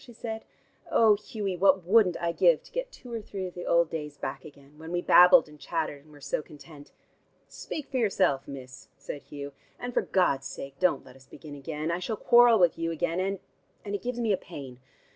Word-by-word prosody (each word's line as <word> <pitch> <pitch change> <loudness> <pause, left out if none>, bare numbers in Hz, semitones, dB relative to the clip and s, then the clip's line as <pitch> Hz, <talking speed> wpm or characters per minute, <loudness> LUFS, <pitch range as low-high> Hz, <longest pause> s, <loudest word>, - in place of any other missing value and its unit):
she 240 - -14
said. 225 -1 -6 0.5
"Oh, 220 -2 +5
Hughie, 205 -2 -4
what 190 0 +4
wouldn't 185 -1 +3
I 170 0 0
give - - +3
to - - -18
get - - -4
two 245 - -12
or 230 - -3
three 195 -2 -6
of 180 - -7
the 175 - -7
old 170 -1 +3
days 150 -2 -5
back - - -5
again, 145 0 -16
when 160 +1 -9
we 175 - 0
babbled 180 +8 +7
and 150 -1 -16
chattered 145 -1 -3
and 155 - -19
were 145 - -15
so 145 - -2
content?" 150 -1 -14 0.6
"Speak 305 - -7
for 265 - -1
yourself, 195 - +1
miss," 130 -1 -10
said 145 - -7
Hugh. 145 -1 -8 0.2
"And 245 0 -6
for - - +2
God's 140 -8 +1
sake 135 0 -9
don't 180 -7 +1
let - - -15
us 135 0 -19
begin 150 0 -11
again. 150 +3 -4
I 170 - -1
shall 215 +4 -3
quarrel 240 0 +6
with 175 -4 +3
you 165 0 -1
again, 165 +1 -1
and 195 +1 -1 0.5
and 200 - -5
it 205 - -2
gives 245 0 -4
me 225 -3 +1
a - - +1
pain. 135 -9 -10
175 Hz, 220 wpm, -28 LUFS, 145-210 Hz, 0.6 s, babbled